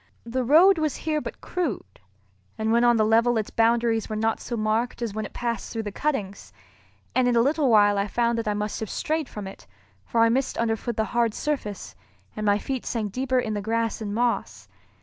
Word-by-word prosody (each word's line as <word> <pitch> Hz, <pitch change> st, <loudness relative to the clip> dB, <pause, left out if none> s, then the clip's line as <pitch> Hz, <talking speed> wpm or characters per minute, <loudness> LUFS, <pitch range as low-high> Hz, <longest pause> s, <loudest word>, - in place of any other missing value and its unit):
The 255 Hz, +2 st, -2 dB
road 330 Hz, +8 st, +6 dB
was 310 Hz, -3 st, 0 dB
here 305 Hz, -1 st, -2 dB
but -, -, -8 dB
crude, 270 Hz, -, -4 dB, 0.6 s
and 220 Hz, 0 st, 0 dB
when 235 Hz, +1 st, +4 dB
on 240 Hz, -1 st, +5 dB
the 215 Hz, -, +3 dB
level 230 Hz, +2 st, +3 dB
its 215 Hz, -, -2 dB
boundaries 230 Hz, -1 st, +2 dB
were 215 Hz, -, -3 dB
not 225 Hz, +1 st, 0 dB
so 240 Hz, -, -5 dB
marked 220 Hz, +3 st, 0 dB
as 225 Hz, -4 st, -3 dB
when 215 Hz, 0 st, -3 dB
it -, -, -23 dB
passed 235 Hz, -3 st, -3 dB
through 225 Hz, -1 st, -3 dB
the 205 Hz, -, -5 dB
cuttings; 205 Hz, -7 st, -3 dB, 0.6 s
and 255 Hz, 0 st, +3 dB
in 245 Hz, -, +2 dB
a -, -, +5 dB
little 285 Hz, +2 st, +2 dB
while 205 Hz, -2 st, +5 dB
I 200 Hz, -, 0 dB
found 235 Hz, +2 st, 0 dB
that 225 Hz, -, -4 dB
I 210 Hz, -, 0 dB
must 210 Hz, 0 st, -3 dB
have 220 Hz, -, -4 dB
strayed 310 Hz, -3 st, -2 dB
from 210 Hz, -2 st, -7 dB
it, 190 Hz, -, -10 dB, 0.4 s
for 230 Hz, -, 0 dB
I 230 Hz, -, +5 dB
missed 255 Hz, +3 st, 0 dB
underfoot 230 Hz, 0 st, -1 dB
the 220 Hz, -, +1 dB
hard 235 Hz, -2 st, +1 dB
surface, 210 Hz, -, -4 dB, 0.4 s
and 215 Hz, 0 st, -3 dB
my 205 Hz, 0 st, +4 dB
feet 260 Hz, +4 st, -4 dB
sank 215 Hz, -4 st, -3 dB
deeper 260 Hz, +3 st, -1 dB
in 220 Hz, -3 st, -2 dB
the 205 Hz, -, -2 dB
grass 225 Hz, +2 st, -1 dB
and 205 Hz, -2 st, -4 dB
moss. 235 Hz, +3 st, -1 dB
230 Hz, 220 wpm, -25 LUFS, 215-245 Hz, 0.6 s, road